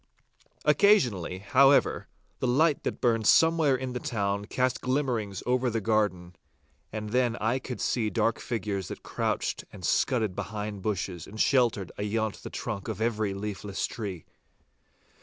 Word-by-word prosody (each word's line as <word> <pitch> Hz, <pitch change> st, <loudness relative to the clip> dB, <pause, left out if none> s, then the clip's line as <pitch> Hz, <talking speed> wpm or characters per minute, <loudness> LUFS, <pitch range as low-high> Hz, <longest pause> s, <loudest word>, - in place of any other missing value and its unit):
Occasionally, 120 Hz, -, +3 dB
however, 135 Hz, +8 st, +4 dB, 0.3 s
the 130 Hz, -, 0 dB
light 145 Hz, +4 st, +3 dB
that -, -, -3 dB
burned 115 Hz, -3 st, +2 dB
somewhere 160 Hz, -4 st, +5 dB
in 130 Hz, 0 st, -4 dB
the 125 Hz, -, -3 dB
town 100 Hz, -3 st, -2 dB
cast 125 Hz, +3 st, 0 dB
glimmerings 125 Hz, -7 st, -1 dB
over 125 Hz, 0 st, +1 dB
the 115 Hz, -1 st, -1 dB
garden, 95 Hz, -5 st, 0 dB, 0.6 s
and 105 Hz, -1 st, -5 dB
then 125 Hz, -1 st, +2 dB
I 115 Hz, +5 st, 0 dB
could 130 Hz, -1 st, -6 dB
see 110 Hz, -4 st, 0 dB
dark 115 Hz, -, 0 dB
figures 105 Hz, -7 st, -3 dB
that -, -, -8 dB
crouched -, -, -2 dB
and -, -, -8 dB
scudded 110 Hz, -7 st, +1 dB
behind 105 Hz, -1 st, -5 dB
bushes 95 Hz, -4 st, -3 dB
and 110 Hz, +2 st, -10 dB
sheltered 120 Hz, -9 st, +2 dB
ayont 110 Hz, +1 st, -2 dB
the -, -, -7 dB
trunk 105 Hz, -4 st, -5 dB
of -, -, -4 dB
every 110 Hz, -3 st, 0 dB
leafless 100 Hz, 0 st, -3 dB
tree. 100 Hz, -8 st, -6 dB
110 Hz, 145 wpm, -28 LUFS, 100-125 Hz, 0.6 s, somewhere